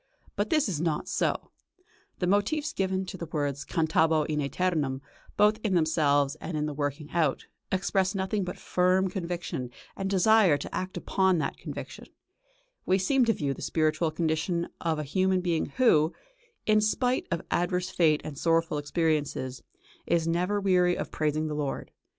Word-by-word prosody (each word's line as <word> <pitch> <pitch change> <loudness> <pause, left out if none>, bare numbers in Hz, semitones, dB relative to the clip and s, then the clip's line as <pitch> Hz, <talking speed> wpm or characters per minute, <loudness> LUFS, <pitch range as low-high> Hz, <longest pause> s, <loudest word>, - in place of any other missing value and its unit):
But - - -1
this 310 -6 +2
is 165 -7 -2
not 165 -3 -1
so. - - -1 0.7
The 180 - -1
motifs 205 - +1
given 190 0 -1
to 190 - -7
the 170 - -6
words 145 -3 -2
"cantabo 160 -1 +2
in 150 0 -1
ætemum," 145 -3 -1 0.4
both 210 +1 +4
in 205 -4 +1
themselves 145 -4 +2
and 170 - -4
in 150 - 0
their 150 - -3
working 145 +1 -3
out, 160 -5 0 0.3
express 190 +1 +1
nothing 195 +1 -1
but 180 - -5
firm 185 +1 +1
conviction 170 - -4 0.3
and 195 0 -3
desire 195 -4 +5
to - - -7
act 185 0 -4
upon 190 -2 +2
that 145 -4 -2
conviction; - - -8 0.8
we 190 - +2
seem 250 +7 +2
to 225 - +3
view 140 -7 -2
the - - -11
spiritual 155 +1 +1
condition 165 +2 -1
of 165 -2 0
a 150 - -2
human 185 +5 +1
being 175 -3 0
who, 165 -11 +3 0.5
in 215 0 +4
spite 245 +4 +1
of 170 -2 -2
adverse 180 +1 0
fate 155 -3 +3
and 150 -2 -7
sorrowful 165 -2 +1
experiences, 145 -5 -1 0.5
is 165 -1 +1
never 180 +5 +1
weary 180 -2 +3
of - - -4
praising 155 0 0
the 155 - -3
Lord. 145 -2 -3
170 Hz, 165 wpm, -28 LUFS, 155-190 Hz, 0.8 s, desire